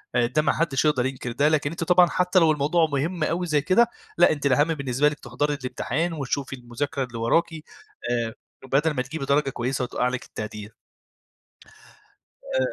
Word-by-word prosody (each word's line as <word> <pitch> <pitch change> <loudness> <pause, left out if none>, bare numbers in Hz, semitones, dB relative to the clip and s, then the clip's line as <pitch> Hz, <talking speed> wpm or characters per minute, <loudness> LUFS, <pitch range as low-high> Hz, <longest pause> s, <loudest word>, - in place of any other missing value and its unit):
آآ 120 - +3
ده 150 +5 +1
ما 150 - +1
حدّش 155 -3 0
يقدر 130 -5 +2
ينكر 130 -2 -4
ده، 140 +5 +2
لكن 155 -1 +1
أنتِ 165 - -4
طبعًا 180 +1 +5
حتى 180 +1 +2
لو 165 -2 +4
الموضوع 155 +3 +2
مُهم 155 +5 -1
أوي 175 +3 -1
زي 150 -3 +2
كده 195 +10 +3 0.3
لأ 175 - +6
أنتِ 145 -2 -3
الأهم 140 +2 +4
بالنسبة 140 0 +1
لكِ 150 - -8
تحضري 135 +5 -2
الامتحان 145 +4 -2
وتشوفي 140 -2 -3
المذاكرة 130 +2 -4
اللي 120 -2 -7
وراكِ 120 +9 +1
آآ، 120 -6 -5 0.4
بدل 150 +4 +3
ما 135 -4 -1
تجيبي 135 +3 -5
درجة 140 0 +2
كويسة 130 +1 -2
وتوقع 125 0 -1
لِك 125 0 -4
التقدير. 105 0 -8 1.8
آآ - - +1
145 Hz, 180 wpm, -24 LUFS, 125-160 Hz, 1.8 s, لأ